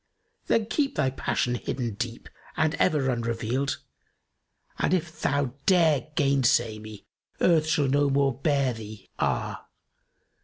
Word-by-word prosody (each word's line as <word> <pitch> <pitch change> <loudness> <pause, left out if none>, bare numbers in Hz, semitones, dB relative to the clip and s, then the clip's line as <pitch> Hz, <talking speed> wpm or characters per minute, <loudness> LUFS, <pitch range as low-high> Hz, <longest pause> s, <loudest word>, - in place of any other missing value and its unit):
Then 225 -2 +2
keep 280 +5 -1
thy 135 -3 +1
passion 125 -1 -1
hidden 120 -1 -3
deep 115 +2 -5 0.3
and 155 0 +2
ever 135 -4 +2
unrevealed, 120 +3 -1 0.5
* - - -33
And 185 - +2
if 165 -2 -4
thou 140 -3 0
dare 165 -7 +4
gainsay 125 -6 +2
me 110 -1 -11 0.3
Earth 160 -3 +3
shall 150 -2 +2
no 140 +1 +2
more 140 -1 +2
bear 140 -1 +1
thee, 110 -3 -10
ah! - - -2
135 Hz, 130 wpm, -26 LUFS, 120-155 Hz, 0.5 s, dare